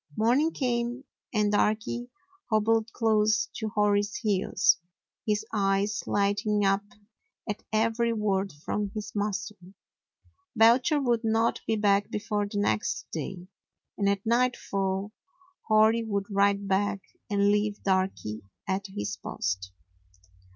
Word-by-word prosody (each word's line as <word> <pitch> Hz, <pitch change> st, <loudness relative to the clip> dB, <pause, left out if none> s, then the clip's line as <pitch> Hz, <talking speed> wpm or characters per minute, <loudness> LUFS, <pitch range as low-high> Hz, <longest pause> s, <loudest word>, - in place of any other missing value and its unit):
Morning 255 Hz, +9 st, +3 dB
came, 245 Hz, -1 st, -1 dB, 0.3 s
and 210 Hz, -2 st, +1 dB
Darky 215 Hz, +4 st, 0 dB, 0.4 s
hobbled 225 Hz, +1 st, +2 dB
close 215 Hz, -2 st, +2 dB
to 220 Hz, -2 st, -3 dB
Hori's 205 Hz, 0 st, +1 dB
heels, 200 Hz, -2 st, +2 dB, 0.5 s
his 210 Hz, -1 st, +1 dB
eyes 200 Hz, 0 st, +1 dB
lighting 205 Hz, +1 st, +1 dB
up 195 Hz, +1 st, +3 dB, 0.7 s
at 210 Hz, -, -3 dB
every 230 Hz, +2 st, +1 dB
word 200 Hz, -3 st, 0 dB
from 200 Hz, +8 st, -3 dB
his 210 Hz, -1 st, -5 dB
master. 210 Hz, +1 st, -2 dB, 1.0 s
Belcher 245 Hz, +7 st, +5 dB
would 240 Hz, -4 st, +1 dB
not 225 Hz, +1 st, +1 dB
be 220 Hz, -, +2 dB
back 205 Hz, -1 st, +2 dB
before 210 Hz, -1 st, -2 dB
the 205 Hz, -, -5 dB
next 200 Hz, -, 0 dB
day, 175 Hz, +3 st, -5 dB, 0.5 s
and 200 Hz, -1 st, +1 dB
at 200 Hz, 0 st, -1 dB
nightfall 205 Hz, -5 st, 0 dB, 0.6 s
Hori 220 Hz, +1 st, +5 dB
would 200 Hz, -3 st, -2 dB
ride 200 Hz, 0 st, +2 dB
back 195 Hz, 0 st, 0 dB, 0.3 s
and 200 Hz, 0 st, +3 dB
leave 210 Hz, 0 st, 0 dB
Darky 185 Hz, -, -1 dB, 0.3 s
at 195 Hz, +1 st, -1 dB
his 105 Hz, -, -4 dB
post. 95 Hz, -1 st, -3 dB
210 Hz, 120 wpm, -28 LUFS, 200-225 Hz, 1.0 s, Belcher